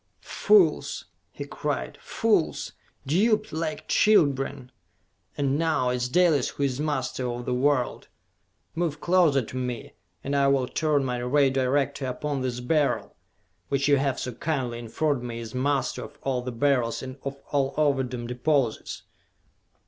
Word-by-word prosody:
"Fools!" 420 -3 +3 0.3
he - - -7
cried. - - -4
"Fools! 210 -8 0 0.3
Duped 215 - +2
like 160 -1 -3
children! 140 -9 +2 0.7
And 140 0 +1
now 155 -6 +1
it 125 - 0
is 125 0 -2
Dalis 160 -3 +3
who 140 - -4
is 135 -1 0
master 130 -4 -2
of 120 0 -5
the 125 - -1
world! 130 0 0 0.7
Move 160 -3 -2
closer 170 -7 +3
to 115 - -10
me, 125 -2 -4 0.3
and 140 +1 -2
I 140 0 +3
will 135 -2 +2
turn 150 -2 +1
my 125 -1 -2
Ray 135 +2 +3
Director 135 +1 0
upon 135 +2 -3
this 125 -1 -2
Beryl, 145 +3 0 0.5
which 140 0 +1
you 145 -1 +5
have 135 -1 0
so 125 - -3
kindly 125 -2 -2
informed 130 +4 -1
me 120 -1 -5
is 115 0 -7
master 135 +1 0
of 145 - -14
all 130 -2 0
the 125 +1 -5
Beryls 125 -1 +1
and 130 +1 -7
of 140 0 -4 0.2
all 135 -1 0
Ovidum 130 -5 0
deposits! 125 0 -1
135 Hz, 150 wpm, -26 LUFS, 125-150 Hz, 0.7 s, you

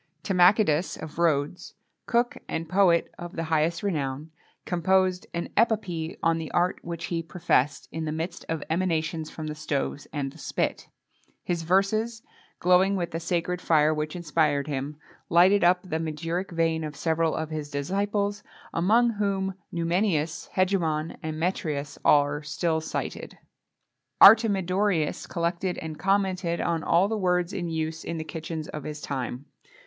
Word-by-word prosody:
Timachidas 180 -3 +3
of 160 +1 -8
Rhodes, 155 0 0 0.3
cook 240 +1 +1
and 165 0 -3
poet 180 -1 +3
of 175 0 -7
the 165 - -2
highest 160 +3 +1
renown, 150 -5 -2 0.3
composed 185 +1 +1
an 170 - -4
epopee 190 -8 0
on 165 0 +2
the 160 - -5
art 175 +1 +1
which 170 0 -5
he 165 - 0
professed, 150 -4 0
in 160 0 -4
the 155 - -2
midst 165 +3 -4
of 160 -2 -2
emanations 160 -2 -1
from 160 - -7
the 155 - -3
stoves 145 -1 -3
and 140 -2 -3
the 160 - -16
spit.[XXII - - -2 0.4
12] - - -38
His 175 -2 -1
verses, 215 +6 +1 0.4
glowing 180 +2 +4
with 175 -3 -2
the 165 - -3
sacred 175 +1 -1
fire 155 -1 +3
which 155 +1 -3
inspired 150 -4 +1
him, 145 0 -4 0.3
lighted 185 +4 +5
up 180 +1 +4
the 160 -4 -3
magiric 165 +4 -3
vein 165 -1 0
of 150 -1 -5
several 160 +2 0
of 160 0 -3
his 155 -2 -4
disciples, 200 +7 -1 0.3
among 225 +8 +3
whom 195 -2 -1 0.2
Numenius, 170 -2 0
Hegemon, 165 -5 +1
and 155 0 -4
Metreas, 155 -5 -2
are 145 0 +4
still 160 +2 -1
cited.[XXII 160 - -5 0.8
13] 225 -1 +9
Artemidorus 185 -3 0
collected 170 +2 -1
and 155 -2 -6
commented 190 -3 +1
on 165 -1 0
all 175 +4 +3
the 220 - -1
words 180 -1 +1
in 175 -4 -3
use 160 0 -3
in 170 - -4
the 160 - -3
kitchens 160 0 -5
of 150 - -6
his 150 0 -6
time. 130 -1 -4
170 Hz, 155 wpm, -26 LUFS, 155-185 Hz, 0.8 s, 13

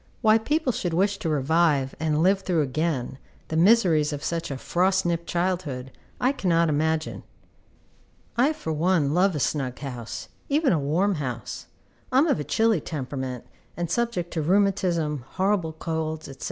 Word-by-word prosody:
Why 220 -1 +5
people 295 +4 0
should 175 -7 -2
wish 195 +2 +1
to 165 - -2
revive, 150 -1 +2
and 155 0 +1
live 190 +2 +4
through 180 -5 +1
again, 135 -2 -2 0.3
the 160 - -3
miseries 170 -5 +4
of 145 -1 -5
such 170 0 -2
a 135 - -4
frost 185 +6 +1
nipped 170 -1 -1
childhood, 170 -8 -2 0.3
I 255 - +3
cannot 170 - +2
imagine. 155 +1 0 1.1
I, 260 +7 +3
for 160 - -4
one, 155 -2 +2
love 185 +1 +3
a - - -1
snug 130 -3 -1
house, 125 -5 -6 0.2
even 290 - +3
a 160 - +2
warm 170 +7 +1
house. 120 -5 -5 0.4
I 255 - +2
am 280 - +6
of 305 - +1
a - - -2
chilly 220 0 +2
temperament, 130 -4 -5 0.3
and 170 -1 -3
subject 230 -6 -1
to 160 - -1
rheumatism, 175 -5 +1
horrible 190 -4 0
colds, 160 -1 -3
&c. 135 - -9
165 Hz, 165 wpm, -25 LUFS, 150-190 Hz, 1.1 s, am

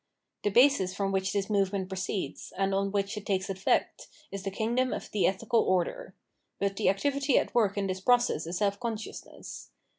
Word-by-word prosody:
The 205 - +1
basis 205 -5 +4
from 195 -1 -1
which 190 0 0
this 200 -1 -1
movement 195 -2 0
proceeds, 190 +1 -4
and 195 0 +1
on 195 0 0
which 200 +1 -1
it 210 - -6
takes 190 -1 0
effect, 190 0 0 0.2
is 195 - -5
the 195 - -3
kingdom 235 +5 0
of - - -6
the 205 - +2
ethical 225 +4 +1
order. 185 - 0 0.4
But 200 0 -1
the - - +3
activity 275 +7 +1
at - - 0
work 210 -4 +2
in 200 - 0
this 185 -1 -3
process 240 -8 +2
is 175 +1 -3
self 200 0 0
consciousness. 225 -3 -6
200 Hz, 185 wpm, -29 LUFS, 190-225 Hz, 0.4 s, basis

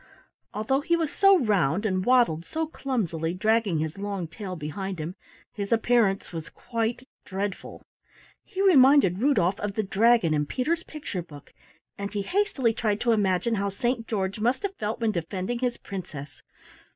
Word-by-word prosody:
Although 245 +7 0
he 340 +3 +2
was 325 -3 -1
so 390 -1 +5
round 200 - +1
and 185 -3 0
waddled 235 -10 +3
so 320 - -2
clumsily, 180 - -2
dragging 215 -2 +2
his 155 +4 -3
long 200 -4 -3
tail 185 +2 -7
behind 185 +5 -5
him, 160 +2 -4 0.4
his 200 -1 -5
appearance 225 -3 +2
was 165 -1 -6
quite 230 +2 -3 0.2
dreadful. 195 0 -5 0.6
He 390 -2 -3
reminded 275 - +6
Rudolf 210 -8 +2
of 205 -1 -3
the 215 - 0
dragon 210 -3 +3
in 150 -1 0
Peter's 320 - -1
picture 290 - -6
book, 145 -4 -13 0.5
and 200 0 -4
he 205 -1 -2
hastily 305 - +1
tried 215 -2 0
to 240 - +2
imagine 205 0 +1
how 200 - 0
Saint 235 +3 -2
George 195 -1 -2
must 245 - +1
have 400 -1 -2
felt 215 - -3
when 225 -2 +1
defending 185 +6 -3
his 245 -1 -1
princess. 155 -7 -8
210 Hz, 165 wpm, -26 LUFS, 185-245 Hz, 0.6 s, reminded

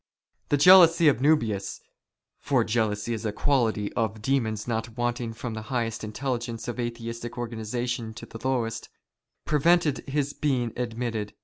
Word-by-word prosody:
The 145 - +3
jealousy 170 0 +7
of 140 - +2
JSIuhius 115 -9 +1 0.3
— - - -58
for 130 -5 +2
jealousy 110 0 -1
is 110 -1 -4
a 110 - -1
quality 110 -4 0
of 110 -2 -1
demons 110 -3 -1
not 115 0 -3
wanting 120 -1 -1
fi^om 115 +1 -6
the 110 - -5
highest 115 -4 -2
intelligences 120 +1 -4
in 120 - -5
Atheistic 115 0 -5
organization 120 0 -3
to 115 - -8
the 115 - -10
lowest 115 -4 -1 0.3
— - - -58
prevented 155 0 +3
his 145 0 -1
being 125 -7 -1
admitted. 115 -3 -3
120 Hz, 150 wpm, -26 LUFS, 110-130 Hz, 0.3 s, jealousy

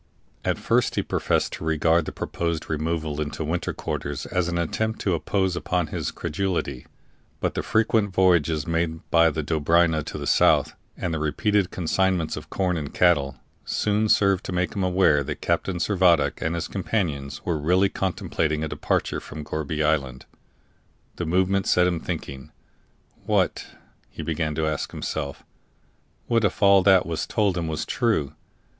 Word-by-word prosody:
At - - 0
first - - +1
he - - 0
professed - - 0
to - - -6
regard 80 +1 +2
the - - -4
proposed 85 -2 -3
removal 80 -1 -2
into 75 +1 -3
winter 85 +3 -2
quarters 70 0 -4
as 90 -1 -1
an 85 0 -2
attempt 110 +7 -1
to 95 - +1
impose 95 +2 0
upon 90 -1 -1
his - - -2
credulity; 90 -6 -3 0.5
but - - -1
the - - -2
frequent 110 -2 +1
voyages 85 -5 +2
made 85 -1 -2
by 85 -1 +5
the 75 0 -3
Dobryna 80 +1 +2
to - - -6
the - - -5
south, - - +3 0.2
and 90 -2 -2
the 80 - -1
repeated 95 +6 +1
consignments 90 -1 0
of - - -9
corn 90 -2 0
and 75 -3 -6
cattle, 75 -6 +3 0.3
soon 105 +1 0
served 100 -2 +3
to - - -4
make 90 0 -1
him 100 - -1
aware 90 -6 +3
that - - -5
Captain 95 -2 -1
Servadac 85 -6 +2
and 80 +1 -1
his 85 - -3
companions 75 -9 -3
were 85 -3 0
really 90 +6 +3
contemplating 80 -5 -1
a - - -1
departure - - -1
from 75 0 -8
Gourbi 75 0 -2
Island. 70 -5 -1 0.9
The 85 - -3
movement 95 +3 +1
set 90 - +4
him 90 -2 0
thinking. 65 -4 -6 0.8
What, - - +1 0.4
he - - -7
began 80 -1 -2
to 80 - 0
ask 75 -2 -2
himself 70 -1 -5 0.8
what 115 -1 +1
if 105 +1 0
all 100 -1 +7
that 95 -1 +5
was 80 -1 -3
told 105 -4 +1
him 85 -2 -2
was 80 -1 -3
true? 105 - 0
85 Hz, 165 wpm, -24 LUFS, 75-95 Hz, 0.9 s, all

